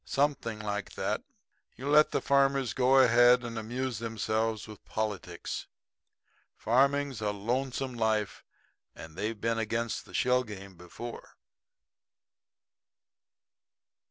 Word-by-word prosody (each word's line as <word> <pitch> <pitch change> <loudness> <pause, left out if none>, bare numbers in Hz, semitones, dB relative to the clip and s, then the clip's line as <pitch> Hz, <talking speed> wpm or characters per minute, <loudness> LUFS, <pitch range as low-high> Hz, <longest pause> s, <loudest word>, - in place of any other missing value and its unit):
"Something 140 -6 0
like 105 -1 -4
that. - - -2 0.5
You 130 +4 -7
let 150 +1 +6
the - - -1
farmers 140 -2 +2
go 130 +1 +4
ahead 120 -1 +6
and 120 -1 -5
amuse 120 +1 -3
themselves 110 -1 -1
with 110 -1 -12
politics. 110 -3 -4 0.9
Farming's 135 +1 +2
a 105 - 0
lonesome 125 +5 -2
life; 110 -3 -1 0.5
and 80 -1 -10
they've 105 +3 -3
been 115 0 0
against 115 +1 -2
the - - -11
shell 125 0 +3
game 100 -4 -9
before." 90 +7 -9
115 Hz, 110 wpm, -30 LUFS, 110-130 Hz, 0.9 s, let